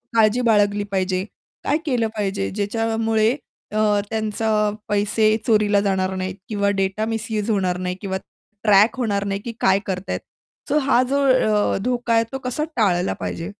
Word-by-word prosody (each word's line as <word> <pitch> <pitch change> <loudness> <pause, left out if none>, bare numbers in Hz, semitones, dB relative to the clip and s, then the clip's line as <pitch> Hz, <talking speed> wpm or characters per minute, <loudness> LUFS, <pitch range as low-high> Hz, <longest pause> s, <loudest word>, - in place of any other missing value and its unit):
काळजी 225 +2 +4
बाळगली 205 -3 +3
पाहिजे? 185 0 0 0.4
काय 290 - +1
केलं 245 -6 +1
पाहिजे 195 -1 -1
ज्याच्यामुळे 225 +2 0 0.4
अ, 215 - -3 0.3
त्यांचा 220 0 -2 0.4
पैसे 210 +1 +2
चोरीला 210 -2 +3
जाणार 190 -1 0
नाहीत 185 0 -3
किंवा 200 -1 +1
डेटा 195 +2 -1
मिस्यूज 225 -1 -2
होणार 185 -4 +1
नाही 180 0 -3
किंवा 190 -2 -2 0.5
ट्रॅक 210 +4 +5
होणार 205 -5 0
नाही, 195 0 -2
की 235 - -5
काय 190 +1 +4
करत 190 0 -4
आहेत. - - -1 0.5
तर 300 - +2
हा 260 -2 +4
जो 280 +1 +1
अ, 215 -7 +3
धोका 245 -2 0
आहे 225 0 +4
तो 270 - -3
कसा 255 +4 -2
टाळला 185 -5 +2
पाहिजे? 170 +4 -4
210 Hz, 160 wpm, -22 LUFS, 195-225 Hz, 0.5 s, ट्रॅक